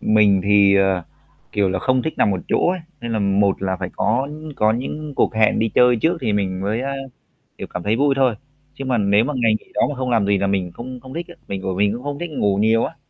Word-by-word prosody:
Mình 105 -3 +4
thì, 100 -1 +5
ờ, 95 -2 +2 0.5
kiểu 100 -2 +2
là, 95 0 -1
không 130 +6 +1
thích 160 - -3
nằm - - +3
một 95 -2 -1
chỗ - - +2
ấy, 185 0 -3 0.2
nên 120 -1 -4
là 110 - 0
một 100 -1 +1
là 95 -1 -1
phải 90 -1 -5
có 120 +6 +1 0.3
có 110 0 +3
những 145 +5 -5
cuộc - - +1
hẹn 110 -1 +3
đi 115 - +1
chơi 125 0 +5
trước 160 +10 +1
thì 115 -5 -1
mình 95 -2 -1
mới, 105 +4 -1
a, 135 +1 -3 0.7
kiểu, - - -6
cảm 90 - -6
thấy 105 +4 +1
vui 140 +2 +2
thôi, 130 -4 +2 0.4
chứ 135 - -7
mà 130 -2 +1
nếu 100 +1 +3
mà 150 - -2
ngày 115 -3 +2
nghỉ - - -25
đó - - +1
mà 145 - -4
không 130 -1 -3
làm 115 -4 +2
gì 100 0 +2
là 100 +1 0
mình 95 -3 -1
không 125 +5 -8
không 130 +1 -11
thích 170 +2 -5
á, 175 - -12
mình 95 -1 -4
bởi 95 -1 -2
mình 100 +2 +2
cũng 120 +2 -7
không 145 0 -4
thích 175 - -4
ngủ 100 -9 0
nhiều 110 +2 +3
á, - - -7
110 Hz, 270 wpm, -20 LUFS, 100-130 Hz, 0.7 s, thì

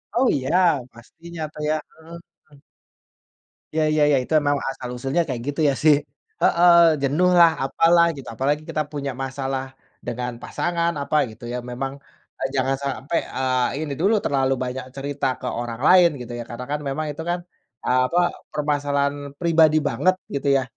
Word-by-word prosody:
Oh, 255 +1 +3
iya, 135 +5 -1 0.4
pastinya 165 +8 -11
tuh 150 - -8
ya, 155 - +2 0.2
heeh, 160 +1 -13 0.4
mmm. 140 - -18 1.2
Ya, 160 - +2
ya, 155 -1 +3
ya, 140 - +4
itu - - -15 0.2
memang 145 - +3 0.2
asal-usulnya 130 +5 -2
kayak 125 -3 -3
gitu, 145 +2 -3
iya, 140 - +3
sih. 155 -2 +7 0.5
Heeh, 175 +1 +5 0.3
jenuh 155 +7 +2
lah, 170 -1 +8
apalah, 170 +5 +4
gitu. 135 - -10
Apalagi 145 +4 0
kita 155 - -1
punya 140 -2 -3
masalah 135 0 -3 0.4
dengan 125 +1 -3
pasangan, 170 -1 -1
apa, 145 +2 -2 0.2
gitu 110 +2 -16
ya, 125 - -2
memang, 135 +2 -4 0.5
eee, 135 - 0
jangan 135 +1 +1
sampai, 140 +4 -1 0.2
eee, 130 +1 0
ini 145 -3 -4
dulu 205 +4 +3
terlalu 135 -1 +1
banyak 125 0 -4
cerita 140 +1 -4
ke - - -5
orang 120 -1 -5
lain 180 -2 +7
gitu 120 0 -8
ya. 120 - -4
Karena 125 +2 -6
kan 150 - -1
memang 155 +3 -2
itu 145 +3 -7
kan, 175 - 0 0.4
eee, 130 0 +2
apa, 175 +4 +1 0.3
permasalahan 145 -1 0 0.2
pribadi 160 -2 +4
banget, 185 0 +2 0.2
gitu, 140 - -2
ya. 130 - 0
140 Hz, 170 wpm, -22 LUFS, 130-160 Hz, 1.2 s, lah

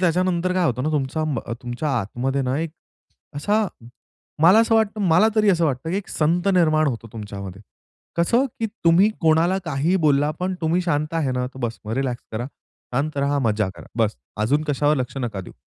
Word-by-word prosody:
त्याच्यानंतर 180 0 +1
काय 185 -1 +2
होतं 125 -5 0
ना 155 - 0
तुमचा 150 +1 -1
म 145 -5 -1
अ, - - -4
तुमच्या 120 +5 -3
आतमध्ये 130 +7 -2
ना 130 +2 -1
एक 165 -1 -2 0.7
असा 210 +8 +1 0.8
मला 185 +7 +7
असं 225 0 +2
वाटतं 220 -1 +1
मला 180 +7 +5
तरी 215 -1 +4
असं 170 -3 +2
वाटतं 140 +1 -1
की 185 - 0
एक 200 - -5
संत 170 +5 +1
निर्माण 155 -3 +3
होतो 115 -3 -3
तुमच्यामध्ये. 100 -2 -7 0.5
कसं 230 +10 +3 0.2
की 225 - +1 0.2
तुम्ही 175 +5 +6
कोणाला 165 +3 +3
काहीही 160 +4 +1
बोलला 145 0 +3
पण 185 +1 -1
तुम्ही 165 +2 +1
शांत 155 -2 -1
आहे 155 -5 0
ना 125 0 -1
तर 130 +1 -11
बस 115 -1 -3
मग 110 - -4
रिलॅक्स 130 -3 -2
करा. 120 +3 -3 0.5
शांत 145 +3 -1
राहा, 140 +1 +1
मजा 110 -5 +1
करा, - - -12
बस. 110 - +1 0.3
अजून 145 +6 +2
कशावर 145 +1 +2
लक्ष 130 +1 -3
नका 110 -5 -3
देऊ. 90 - -11
150 Hz, 195 wpm, -22 LUFS, 125-175 Hz, 0.8 s, मला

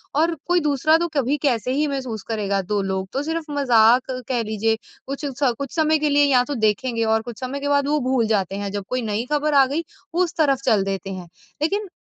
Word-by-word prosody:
और 330 +3 +2
कोई 355 0 +3
दूसरा 300 +2 +3
तो 345 +1 -1
कभी 280 +1 +1
कैसे 250 -2 +1
ही 300 +2 +1
महसूस 260 -7 -4
करेगा? 200 -3 0
दो 205 +2 -1
लोग 190 0 -2
तो 275 +2 -1
सिर्फ़ 320 -1 -4
मज़ाक 250 -2 +4 0.2
कह 240 -3 0
लीजिए 220 +1 0 0.3
कुछ 280 +2 -4
स 270 -4 +3
कुछ 280 +1 -5
समय 315 -1 +3
के 300 -1 +1
लिए 290 0 +4
या 255 -3 +4
तो 285 +1 -4
देखेंगे 230 +2 0
और 220 0 +2
कुछ 235 -1 -9
समय 260 +2 -4
के 285 - -3
बाद 285 0 +2
वो 300 0 +2
भूल 240 -4 +2
जाते 195 -3 0
हैं 200 -1 -4
जब 200 -1 -4
कोई 255 0 -1
नई 220 +1 -2
खबर 295 0 +1
आ 275 -1 +6
गई 300 +6 -2 0.3
उस 350 -1 0
तरफ 275 -4 +2
चल 205 -3 +3
देते 195 0 -4
हैं। 180 -2 -8 0.3
लेकिन, 400 +6 0
260 Hz, 230 wpm, -22 LUFS, 220-290 Hz, 0.3 s, आ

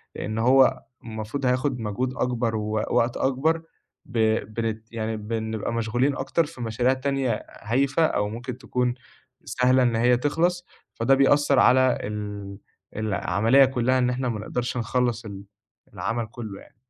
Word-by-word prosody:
لإن 110 +1 -4
هو 130 +3 +4 0.2
المفروض 110 +4 -5
هياخُد 125 +1 +1
مجهود 120 +4 -2
أكبر 120 -2 0
ووقت 110 +2 0
أكبر 155 +5 +1 0.4
ب 120 -3 -4 0.3
بنت 110 0 -4
يعني 110 -1 -2
بنبقى 110 +1 -3
مشغولين 120 +5 0
أكتر 135 +5 0
في 130 - -11
مشاريع 120 +3 +1
تانية 130 -4 -1 0.2
هايفة 140 +8 +2
أو 105 -8 0
ممكن 120 +3 -6
تكون 125 -2 -1 0.5
سهلة 130 0 +3
إن 120 -2 +2
هي 120 +2 +4
تخلص، 170 +7 0 0.3
فده 125 +4 +3
بيأثّر 140 0 +4
على 130 0 +5
ال 105 -1 -6 0.4
العملية 110 +4 +3
كُلّها 130 0 +1
إن 125 -1 +2
إحنا 125 0 -1
ما 110 -3 -3
نقدرش 125 +4 -3
نخلَّص 120 -1 -1
ال 100 -2 -8 0.5
العمل 110 +5 -2
كُلّه 110 -3 -8
يعني. - - -19
120 Hz, 140 wpm, -25 LUFS, 110-130 Hz, 0.5 s, على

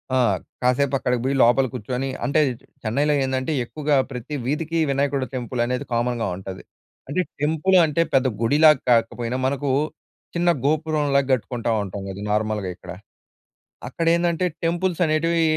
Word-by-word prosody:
ఆ! - - +3 0.4
కాసేపు 130 +2 +2
అక్కడికి 125 -2 -1
బోయి, 135 +1 +1
లోపల 125 +3 +5
కూర్చొని, 125 +3 -3 0.2
అంటే 150 +2 +2 0.4
చెన్నైలో 140 +7 +1
ఏందంటే, 130 +2 -2
ఎక్కువగా 150 +3 -1 0.2
ప్రతి 125 +4 -5
వీధికి 165 +4 -1
వినాయకుడి 140 -1 0
టెంపుల్ 125 -1 -3
అనేది 125 +1 -2
కామన్‌గా 120 -1 0
ఉంటది. 95 0 -8 0.5
అంటే 185 +6 +1 0.2
టెంపుల్ 160 +5 +2
అంటే 155 +2 0
పెద్ద 135 0 +4
గుడిలా 150 +7 +6 0.2
కాకపోయినా, 120 +1 +1
మనకు 140 +1 -2 0.7
చిన్న 175 0 +2 0.2
గోపురంలా 150 -2 +2
గట్టుకుంటా 120 -1 -1
ఉంటాం 100 0 -6
గదా! 95 +1 -7
నార్మల్‍గా 105 -2 -1
ఇక్కడ. - - -11 1.0
అక్కడ 165 +5 -3
ఏందంటే, 170 +1 0 0.2
టెంపుల్స్ 175 +1 0
అనేటివి 165 +2 +1
135 Hz, 135 wpm, -23 LUFS, 120-155 Hz, 1.0 s, గుడిలా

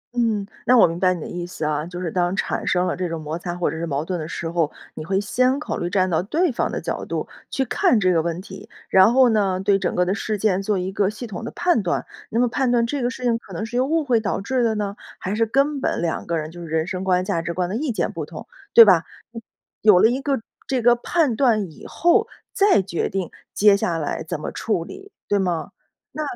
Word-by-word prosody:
嗯， 220 -4 +1 0.2
那 250 - +6
我 - - +8
明 165 +1 -5
白 185 -1 +3
你 170 - -7
的 - - -6
意 175 0 -5
思 160 -3 -5
啊。 150 0 0
就 180 0 -7
是 175 -3 -3
当 180 +1 0
产 - - -2
生 180 0 +2
了 - - -1
这 180 -2 -3
种 165 - -4
摩 155 +2 -5
擦 175 0 -4
或 175 - -1
者 - - -5
是 170 - -3
矛 145 +1 -2
盾 180 0 -3
的 155 - -5
时 170 - -5
候， 165 -3 0 0.2
你 155 - -7
会 190 +4 0
先 255 +6 +1
考 305 - -4
虑 175 - -2
站 185 -1 +2
到 170 -3 +1
对 305 - +1
方 - - -1
的 - - -3
角 - - -4
度， - - -4 0.2
去 265 - -1
看 235 0 +2
这 185 -2 +3
个 165 - +3
问 170 +1 -3
题， 190 +1 -11 0.2
然 190 +3 +6
后 255 0 +5
呢， 195 -4 +1
对 195 0 +2
整 - - -2
个 180 - +2
的 185 - 0
事 210 +1 -2
件 195 -2 +1
做 200 0 0
一 185 +1 -2
个 195 0 +1
系 215 +3 -7
统 215 -2 -7
的 230 - -4
判 350 - +1
断。 175 -2 -1 0.2
那 230 - -1
么 245 - +4
判 255 +2 0
断 235 -1 +3
这 275 +3 -3
个 245 - +1
事 250 - -8
情， 235 -2 +1
可 195 - -14
能 215 +6 -3
是 240 - -7
由 255 +2 +2
误 325 +1 +1
会 250 -5 +2
导 215 - -2
致 250 +6 -1
的 225 -1 +1
呢？ 205 -1 -3 0.2
还 190 - -4
是 225 +1 +1
根 275 +4 +1
本 - - 0
两 165 - -2
个 170 -1 0
人 155 0 -4
就 175 +1 -10
是 170 - -7
人 160 0 0
生 185 +1 -4
观、 185 -1 +1
价 170 - -1
值 170 - -4
观 180 -1 0
的 190 - -4
意 275 +3 -1
见 220 - -1
不 - - -5
同， - - -9 0.3
对 230 - +11
吧？ 180 -5 +5 0.8
有 205 -4 +6
了 - - +6
一 260 +3 -1
个 275 -1 0 0.3
这 255 -4 -1
个 240 0 +6
判 285 +1 0
断 215 - +2
以 - - -14
后， 420 +7 +2 0.3
再 390 - +4
决 170 -3 -2
定， 190 -3 -3 0.2
接 205 -1 +6
下 175 -4 -1
来 155 0 -3
怎 160 0 -4
么 - - -5
处 210 -7 -1
理， 390 - -11 0.2
对 205 - +2
吗？ 180 -4 -2 0.4
那 310 - -5
195 Hz, 285 characters per minute, -22 LUFS, 175-240 Hz, 0.8 s, 对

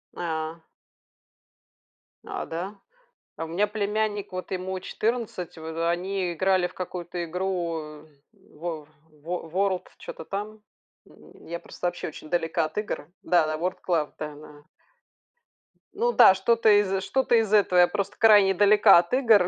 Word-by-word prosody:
А. 160 -1 -4 1.7
А, - - -5
да! 180 +5 -5 0.6
А 165 - -3
у - - -8
меня 190 +6 +1
племянник, 210 -1 -2
вот 185 +1 -6
ему 185 0 -3
14, 215 -5 -3
в 160 +1 -3
они 180 +1 -1
играли 185 +1 +2
в 180 - -17
какую-то 175 -1 -5
игру, 165 -4 -4 0.3
во 165 -6 -8 0.2
во 165 +3 -6
World, 190 +1 0
что-то - - -9
там. 210 +3 -5 0.4
Я 170 +1 -10
просто 175 - -5
вообще 175 - -4
очень 155 0 -10
далека 165 -1 0
от 155 - -9
игр. 210 -7 -3
Да 175 -3 +3
да, 155 - -1
World 180 +3 -2
Claw, 160 -4 0
да 150 -1 -6
да. 150 0 -14 1.3
Ну 470 +4 +1
да, 190 - +7
что-то 225 +3 +2
из 195 -2 +3
что-то 265 0 +1
из 225 -3 +2
этого. 195 -4 +4
Я 175 - +7
просто 200 +1 -3
крайне 205 -3 +6
далека 205 +1 +6
от 170 +5 -3
игр, 225 -8 +5
185 Hz, 145 wpm, -26 LUFS, 165-205 Hz, 1.7 s, да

